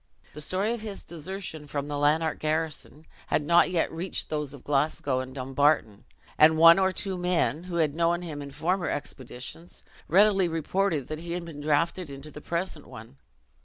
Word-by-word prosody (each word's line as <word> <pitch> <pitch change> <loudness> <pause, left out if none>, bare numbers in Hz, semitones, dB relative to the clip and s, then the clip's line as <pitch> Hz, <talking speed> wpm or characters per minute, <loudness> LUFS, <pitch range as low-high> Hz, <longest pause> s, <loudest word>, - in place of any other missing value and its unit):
The 150 - -7
story 195 +8 0
of 235 - -5
his 210 -3 -6
desertion 170 -2 -6
from 145 0 -3
the 145 - -3
Lanark 155 +2 +2
garrison 155 0 -2 0.2
had 150 - +1
not 170 +4 +5
yet 175 -2 0
reached 170 +3 -3
those 150 -2 -2
of 140 -2 -10
Glasgow 140 -2 0
and 130 +1 -6
Dumbarton; 135 -5 +1 0.3
and 155 +1 +7
one 165 +3 +8
or 190 0 +3
two 190 -1 -3
men, 175 -2 0
who 180 -1 -5
had 155 -3 +1
known 170 +1 +1
him 150 -4 -6
in 140 - -7
former 170 +6 -1
expeditions, 135 +4 -7 0.2
readily 195 +1 +5
reported 165 -2 -1
that 155 0 -4
he 170 +1 -5
had 175 -1 -4
been 155 -3 -8
drafted 155 +3 0
into 140 +2 -9
the 150 - -10
present 170 -2 -3
one. 115 +5 -12
160 Hz, 180 wpm, -27 LUFS, 145-175 Hz, 0.3 s, one